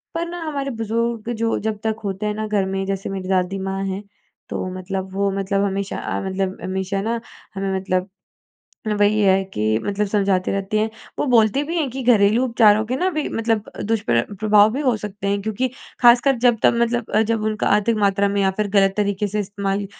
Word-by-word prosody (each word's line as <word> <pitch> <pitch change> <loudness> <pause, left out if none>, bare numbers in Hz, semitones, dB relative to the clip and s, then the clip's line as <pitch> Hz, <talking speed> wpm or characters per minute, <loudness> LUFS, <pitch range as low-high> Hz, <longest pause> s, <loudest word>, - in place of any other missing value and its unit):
पर 335 +1 -1
ना 350 0 -6
हमारे 280 -3 -3
बुज़ुर्ग 230 +1 -1
जो 225 - +1
जब 215 -1 -2
तक 220 -1 -1
होते 195 +1 -3
हैं 210 - 0
ना 215 0 -3
घर 205 -2 +1
में, 195 0 -2
जैसे 195 0 -3
मेरी 190 -1 -5
दादी 190 0 0
माँ 195 0 -3
हैं, 195 +1 -4 0.5
तो - - -3
मतलब 190 0 -5
वो 200 0 0
मतलब 195 +1 0
हमेशा 195 0 -2
अ, - - -3
मतलब 190 0 -2
हमेशा 190 +1 -2
ना 230 +2 -2 0.3
हमें 195 0 -2
मतलब, 185 0 -1 0.9
वही 205 +1 +3
है 195 -1 +4
कि 110 - 0
मतलब 205 +1 -1
समझाते 195 -2 +1
रहती 200 +2 -1
है, 220 +1 0 0.3
वो - - 0
बोलते 230 +4 +4
भी 330 +4 -3
हैं 300 -4 0
कि 265 +2 -5
घरेलू 225 0 +4
उपचारों 220 -3 +4
के 250 +3 -1
ना 370 +6 +1
भी 310 -4 -2
मतलब 225 -2 -1
अ, - - -5
दुष्प्र 200 - +1 0.2
प्रभाव 210 0 +5
भी 280 - -1
हो 250 -5 +2
सकते 205 -1 -4
हैं 200 0 0
क्योंकि 220 +5 -1 0.3
खासकर 245 +2 +6
जब 240 -2 +4
तब - - +5
मतलब 235 -1 -1
अ, 215 - +3
जब 225 -1 0
उनका 215 - -2
अधिक 220 +2 +1
मात्रा 200 -1 +2
में 200 0 0
या 190 - +3
फिर 210 -1 0
गलत 195 -1 +3
तरीके 205 0 0
से 210 +2 -1
इस्तेमाल, 200 0 -2
205 Hz, 210 wpm, -21 LUFS, 195-225 Hz, 0.9 s, खासकर